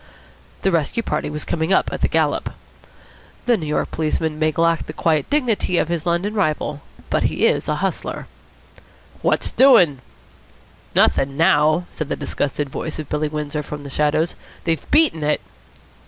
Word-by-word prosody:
The 195 Hz, -, +3 dB
rescue 170 Hz, +7 st, 0 dB
party 150 Hz, -6 st, -2 dB
was 150 Hz, 0 st, -5 dB
coming 160 Hz, +2 st, -1 dB
up 190 Hz, -, +2 dB
at -, -, -4 dB
the -, -, +3 dB
gallop. -, -, 0 dB, 0.9 s
The 245 Hz, -, +4 dB
New 165 Hz, -8 st, -4 dB
York 150 Hz, -, -1 dB
policeman 155 Hz, 0 st, -1 dB
may 155 Hz, 0 st, +2 dB
lack 165 Hz, +2 st, +1 dB
the 155 Hz, -, -6 dB
quiet 155 Hz, -3 st, +1 dB
dignity 245 Hz, -10 st, +1 dB
of 165 Hz, -, +1 dB
his 170 Hz, -1 st, -2 dB
London 175 Hz, +5 st, 0 dB
rival, 155 Hz, -7 st, -1 dB, 0.3 s
but -, -, +2 dB
he -, -, +1 dB
is -, -, +1 dB
a -, -, +1 dB
hustler. -, -, -3 dB, 1.0 s
"What's -, -, +1 dB
doing?" 180 Hz, -, +5 dB, 1.0 s
"Nothing 135 Hz, 0 st, +3 dB
now," 160 Hz, 0 st, +3 dB
said 155 Hz, -2 st, -5 dB
the -, -, 0 dB
disgusted 145 Hz, 0 st, -2 dB
voice 155 Hz, +3 st, -5 dB
of 155 Hz, -, -6 dB
Billy 150 Hz, 0 st, 0 dB
Windsor 150 Hz, 0 st, -3 dB
from 145 Hz, 0 st, -7 dB
the 140 Hz, -, -8 dB
shadows. 150 Hz, +4 st, +1 dB, 0.3 s
"They've 165 Hz, -3 st, -2 dB
beaten 300 Hz, -, +3 dB
it." 150 Hz, 0 st, +1 dB
155 Hz, 165 wpm, -21 LUFS, 150-175 Hz, 1.0 s, doing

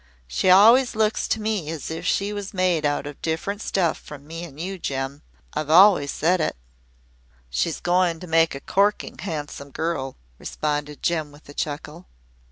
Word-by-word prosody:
She 60 Hz, -, +1 dB
always 230 Hz, +7 st, +7 dB
looks 215 Hz, 0 st, +1 dB
to 220 Hz, -, 0 dB
me 210 Hz, -7 st, -2 dB
as 160 Hz, -1 st, -5 dB
if 165 Hz, +2 st, -4 dB
she 200 Hz, +1 st, 0 dB
was 200 Hz, -1 st, -6 dB
made 180 Hz, -5 st, +2 dB
out 145 Hz, 0 st, -1 dB
of 145 Hz, -1 st, -8 dB
different 180 Hz, +6 st, -2 dB
stuff 175 Hz, -7 st, 0 dB
from 145 Hz, -1 st, -11 dB
me 165 Hz, +2 st, -7 dB
an' 150 Hz, -5 st, -10 dB
you, 185 Hz, +4 st, -5 dB
Jem. 135 Hz, -1 st, -3 dB, 0.3 s
I've 155 Hz, -1 st, -3 dB
always 175 Hz, -3 st, +7 dB
said 175 Hz, +5 st, +1 dB
it." -, -, -1 dB, 1.0 s
"She's 110 Hz, -, -1 dB
going 175 Hz, -2 st, +1 dB
to -, -, -6 dB
make 165 Hz, -2 st, +3 dB
a 135 Hz, -, -7 dB
corking 200 Hz, +1 st, 0 dB
handsome 150 Hz, -5 st, -5 dB
girl," 140 Hz, -3 st, -3 dB, 0.2 s
responded 150 Hz, -1 st, -3 dB
Jem 160 Hz, -3 st, 0 dB
with 145 Hz, +1 st, -18 dB
a -, -, -9 dB
chuckle. 150 Hz, +4 st, -5 dB
165 Hz, 175 wpm, -24 LUFS, 145-190 Hz, 1.0 s, always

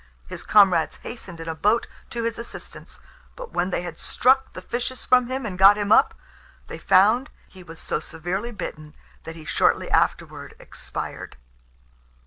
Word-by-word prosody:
His -, -, -7 dB
comrades 190 Hz, -6 st, +4 dB
hastened 190 Hz, -8 st, -8 dB
in 165 Hz, -, -8 dB
a 160 Hz, -, -2 dB
boat 210 Hz, +8 st, +1 dB, 0.2 s
to 235 Hz, -1 st, -4 dB
his 230 Hz, 0 st, -2 dB
assistance; 235 Hz, -, -10 dB, 0.3 s
but -, -, -9 dB
when 180 Hz, +1 st, 0 dB
they 180 Hz, -, -2 dB
had 170 Hz, -2 st, -8 dB
struck 265 Hz, +2 st, +2 dB
the 185 Hz, -, -8 dB
fishes 245 Hz, +3 st, -4 dB
from 250 Hz, -1 st, +4 dB
him 260 Hz, 0 st, -4 dB
and 185 Hz, -4 st, -6 dB
got 195 Hz, +2 st, +8 dB
him 205 Hz, 0 st, -2 dB
up, -, -, +5 dB, 0.5 s
they -, -, -9 dB
found 215 Hz, +8 st, +4 dB, 0.2 s
he 190 Hz, -, -15 dB
was 165 Hz, -2 st, -12 dB
so -, -, -2 dB
severely 175 Hz, +8 st, -5 dB
bitten, 155 Hz, -8 st, -8 dB, 0.3 s
that 165 Hz, -, -8 dB
he 160 Hz, -2 st, -12 dB
shortly -, -, +1 dB
afterward -, -, -1 dB
expired. -, -, -8 dB
200 Hz, 165 wpm, -23 LUFS, 170-235 Hz, 0.5 s, got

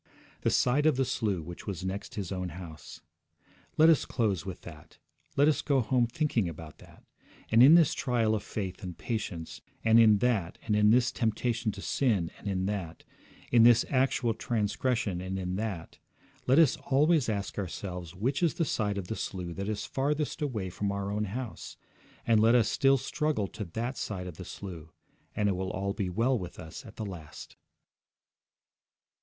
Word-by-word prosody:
'The -, -, +2 dB
side 140 Hz, +5 st, +2 dB
of 155 Hz, -, +4 dB
the 135 Hz, 0 st, +1 dB
slough 105 Hz, -9 st, -1 dB
which 85 Hz, +5 st, -9 dB
was 95 Hz, -2 st, -4 dB
next 100 Hz, +2 st, -5 dB
his 100 Hz, -3 st, -4 dB
own 90 Hz, -1 st, -3 dB
house.' 80 Hz, -2 st, -10 dB, 0.8 s
Let 155 Hz, -, +7 dB
us 165 Hz, -3 st, +5 dB
close 100 Hz, -8 st, -1 dB
with 95 Hz, -, -6 dB
that. 75 Hz, -3 st, -13 dB, 0.4 s
Let 145 Hz, +2 st, +5 dB
us 155 Hz, -, +2 dB
go 140 Hz, -3 st, +2 dB
home 120 Hz, +1 st, +2 dB
thinking 120 Hz, -, 0 dB
about 80 Hz, -1 st, -10 dB
that. -, -, -17 dB, 0.5 s
And 115 Hz, +1 st, +6 dB
in 140 Hz, +6 st, +9 dB
this 165 Hz, -4 st, +5 dB
trial 120 Hz, -5 st, +1 dB
of 110 Hz, -, 0 dB
faith 95 Hz, -3 st, -5 dB
and 90 Hz, -3 st, -7 dB
patience, 100 Hz, -8 st, -4 dB, 0.2 s
and 115 Hz, 0 st, +6 dB
in 110 Hz, -2 st, +7 dB
that, 100 Hz, -6 st, 0 dB
in 105 Hz, -1 st, +4 dB
this 120 Hz, +2 st, +4 dB
temptation 115 Hz, -1 st, -1 dB
to 100 Hz, -, -9 dB
sin, 105 Hz, -11 st, +1 dB
and -, -, -9 dB
in 95 Hz, -2 st, -1 dB
that, 95 Hz, -5 st, -4 dB, 0.5 s
in 120 Hz, -, +6 dB
this 120 Hz, 0 st, +6 dB
actual 130 Hz, -3 st, +2 dB
transgression, 110 Hz, -3 st, -1 dB
and 95 Hz, +1 st, -4 dB
in 90 Hz, -1 st, -3 dB
that, 100 Hz, -6 st, -5 dB, 0.5 s
let 130 Hz, +3 st, +5 dB
us 165 Hz, -5 st, +5 dB
always 145 Hz, -1 st, +2 dB
ask 100 Hz, -1 st, -3 dB
ourselves 90 Hz, -2 st, -5 dB
which 130 Hz, -, -1 dB
is 170 Hz, -2 st, +2 dB
the 170 Hz, -2 st, 0 dB
side 105 Hz, -6 st, -1 dB
of 100 Hz, -, -3 dB
the 110 Hz, -, -3 dB
slough 90 Hz, -5 st, -4 dB
that 100 Hz, +2 st, -3 dB
is 105 Hz, -1 st, -3 dB
farthest 145 Hz, +3 st, -1 dB
away 110 Hz, -11 st, -2 dB
from 100 Hz, +2 st, -2 dB
our 100 Hz, 0 st, -3 dB
own 105 Hz, +1 st, -1 dB
house, 120 Hz, +4 st, -6 dB, 0.5 s
and 115 Hz, -2 st, +4 dB
let 115 Hz, +2 st, +5 dB
us 115 Hz, -3 st, +4 dB
still 135 Hz, -1 st, +3 dB
struggle 150 Hz, -5 st, -1 dB
to 105 Hz, -, -6 dB
that 115 Hz, +9 st, -4 dB
side 95 Hz, -3 st, -4 dB
of 90 Hz, -3 st, -8 dB
the 95 Hz, -, -8 dB
slough, 85 Hz, -5 st, -8 dB, 0.4 s
and 105 Hz, -, +1 dB
it 100 Hz, -, +1 dB
will 95 Hz, +1 st, -3 dB
all 100 Hz, 0 st, -2 dB
be 100 Hz, -4 st, -2 dB
well 115 Hz, +7 st, +1 dB
with 90 Hz, -2 st, -8 dB
us 80 Hz, -, -9 dB
at -, -, -13 dB
the 110 Hz, -, -5 dB
last. 85 Hz, -6 st, -9 dB
105 Hz, 185 wpm, -29 LUFS, 95-125 Hz, 0.8 s, in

